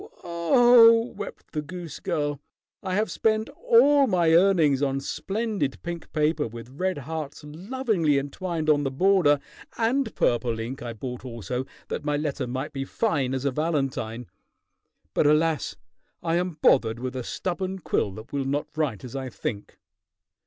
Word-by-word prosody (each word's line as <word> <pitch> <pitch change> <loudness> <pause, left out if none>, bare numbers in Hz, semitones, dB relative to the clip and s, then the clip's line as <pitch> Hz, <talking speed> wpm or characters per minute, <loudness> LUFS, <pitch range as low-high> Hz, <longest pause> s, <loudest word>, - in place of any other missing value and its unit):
Oh!" 230 +6 +5
wept 205 -1 -8
the 150 - -2
goose 170 +1 -8
girl, 145 -5 -2 0.4
"I 185 -2 -2
have 215 +2 0
spent 220 +1 +1
all 290 - +4
my 175 -5 +3
earnings 165 -6 +4
on 135 -1 +1
splendid 195 - -2
pink 170 -1 -6
paper 155 -1 +1
with 115 +2 -10
red 185 +6 -2
hearts 150 +1 -6
lovingly 175 - 0
entwined 155 +4 -3
on 150 -1 +4
the 135 - 0
border, 155 0 +3 0.4
and 235 +1 0
purple 120 -1 +1
ink 120 +4 -5
I 120 -1 -5
bought 125 +3 -6
also 125 +1 -4 0.2
that - - -3
my 145 0 0
letter 145 -3 -2
might 130 +2 -4
be 135 -1 -3
fine 135 - 0
as 130 +1 -3
a 140 - +2
valentine. 135 -6 -2 0.9
But, - - +3
alas! 150 -3 +2 0.5
I 165 0 +1
am 180 -2 -2
bothered 115 -3 +4
with 130 +1 -5
a 130 - -3
stubborn 185 +6 -3
quill 130 - -1
that 110 +6 -11
will 140 -1 -1
not 140 +2 -2
write 150 -10 -1
as 125 0 -8
I 135 -1 -4
think. 105 -3 -5
150 Hz, 160 wpm, -26 LUFS, 135-185 Hz, 0.9 s, Oh